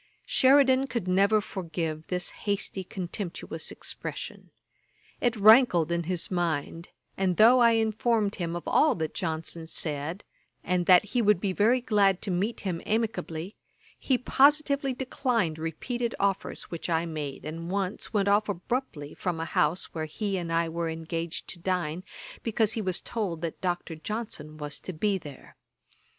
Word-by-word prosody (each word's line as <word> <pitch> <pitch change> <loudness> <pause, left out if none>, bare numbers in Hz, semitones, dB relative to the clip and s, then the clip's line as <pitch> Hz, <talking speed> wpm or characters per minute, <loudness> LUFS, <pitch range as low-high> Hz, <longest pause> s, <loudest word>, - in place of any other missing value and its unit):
Sheridan 265 0 +5
could 235 -8 -3
never 200 +4 +4
forgive 165 -6 -4
this 180 -1 -1 0.2
hasty 195 -1 -1
contemptuous 185 0 -4
expression. - - -6 0.7
It 240 -1 +1
rankled 210 - +6
in 170 -1 0
his 180 +1 -2
mind; 170 -1 -2 0.3
and 185 -2 +1
though 235 +4 +7
I 235 -1 +6
informed 220 -1 +1
him 170 -2 -3
of 175 - -4
all 310 - +4
that 160 -2 -3
Johnson 165 -2 -3
said, 155 +3 -4 0.4
and 180 -1 0
that 180 +1 +7
he 245 - +3
would 210 -4 +4
be 190 -1 -1
very 230 +6 +3
glad 200 -5 +3
to 195 - -1
meet 200 +6 -1
him 180 -4 -3
amicably, 200 -5 -2 0.4
he 260 - +2
positively 280 +1 +3
declined 235 - -1
repeated 235 - -3
offers 195 -1 -1
which 170 +1 -5
I 165 0 +1
made, 150 -5 -5
and 165 +2 -5
once 195 0 -2
went 200 -2 +1
off 205 +1 +3
abruptly 180 - -3
from 175 -3 -3
a 165 - -2
house 160 +2 0
where 160 -1 -3
he 195 +6 -3
and 170 -3 -3
I 165 0 +2
were 165 0 -2
engaged 165 +1 -4
to 175 - -5
dine, 180 -1 -2 0.4
because 225 -1 +1
he 225 - -2
was 185 -3 -1
told 195 -8 -3
that 165 -2 -4
Dr. 175 -2 -2
Johnson 160 -5 -6
was 150 -1 -5
to 185 - -7
be 195 +4 0
there. 145 -5 -12
185 Hz, 160 wpm, -28 LUFS, 165-220 Hz, 0.7 s, though